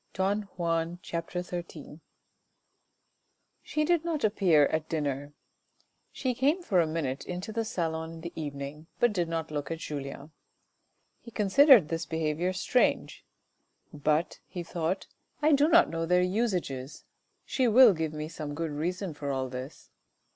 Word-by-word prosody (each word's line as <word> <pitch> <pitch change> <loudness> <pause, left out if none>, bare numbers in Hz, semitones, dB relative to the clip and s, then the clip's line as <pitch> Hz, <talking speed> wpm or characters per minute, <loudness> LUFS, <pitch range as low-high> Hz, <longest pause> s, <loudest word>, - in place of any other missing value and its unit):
Don 200 +2 0
Juan, 165 0 -1
c. - - -7 0.2
xiii. 175 -4 -6 1.6
She 305 0 -1
did 345 0 +2
not 330 -3 -2
appear 185 -8 +4
at 155 +2 -2
dinner. 145 -2 -2 0.8
She 255 -2 -2
came 285 +9 +1
for 185 - +3
a 165 - +1
minute 145 -4 -2
into 180 +4 -5
the 225 +1 0
salon 160 -5 -3
in 165 - -10
the 170 +1 -7
evening, 145 0 -6
but 240 -3 +3
did 175 -4 -1
not 165 -1 -3
look 145 -1 -3
at 165 - -3
Julien. 145 -1 -6 0.9
He 235 - -12
considered 225 - +6
this 165 0 -3
behaviour 160 +2 -1
strange, 185 +7 0 0.4
" - - -42
but," 150 +2 0
he 180 -2 -6
thought, 170 +2 -2 0.2
" - - -41
I 305 - +5
do 290 +1 +5
not - - +6
know 165 0 -2
their 180 +1 +4
usages. 180 - -2 0.4
She 260 -2 +1
will 235 -1 +8
give 160 -2 -2
me 155 0 -5
some 155 -3 -6
good 165 0 -3
reason 175 +4 -3
for 145 -1 -5
all 130 -1 -1
this." 130 +3 -8
165 Hz, 155 wpm, -29 LUFS, 150-200 Hz, 1.6 s, will